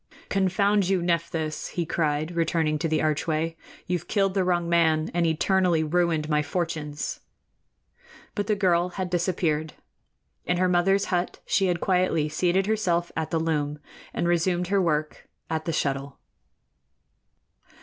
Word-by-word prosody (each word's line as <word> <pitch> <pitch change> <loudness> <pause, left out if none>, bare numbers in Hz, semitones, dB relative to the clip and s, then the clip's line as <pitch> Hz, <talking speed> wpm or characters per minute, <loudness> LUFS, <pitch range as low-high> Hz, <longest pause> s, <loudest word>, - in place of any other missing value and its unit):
"Confound 195 0 +2
you, 190 -1 +2
Nephthys!" 165 -2 -1
he 175 - 0
cried, 155 -1 -1
returning 160 -2 +1
to 165 - 0
the 155 -1 0
archway, 155 +1 0 0.3
"you've 175 -1 -2
killed 195 -2 +1
the 190 -1 +1
wrong 175 -1 +1
man 160 -2 +2
and 170 -1 +2
eternally 175 0 +2
ruined 165 -1 +1
my 150 -1 +2
fortunes!" 150 -1 -3 1.1
But 205 -1 -2
the 215 - +2
girl 180 -3 +2
had 185 -2 -3
disappeared. 165 -3 0 0.7
In 180 - +1
her 185 +1 +3
mother's 185 +2 +3
hut 175 0 -1
she 195 - +2
had 175 -2 0
quietly 180 -5 +1
seated 180 +4 +1
herself 180 -5 0
at 160 -1 -2
the 165 - 0
loom 150 -2 -1 0.3
and 170 - -1
resumed 175 +1 +1
her 200 -1 +3
work 155 -3 -1 0.2
at 160 -1 -2
the 165 - -1
shuttle. 140 -2 -2
170 Hz, 145 wpm, -26 LUFS, 155-180 Hz, 1.1 s, her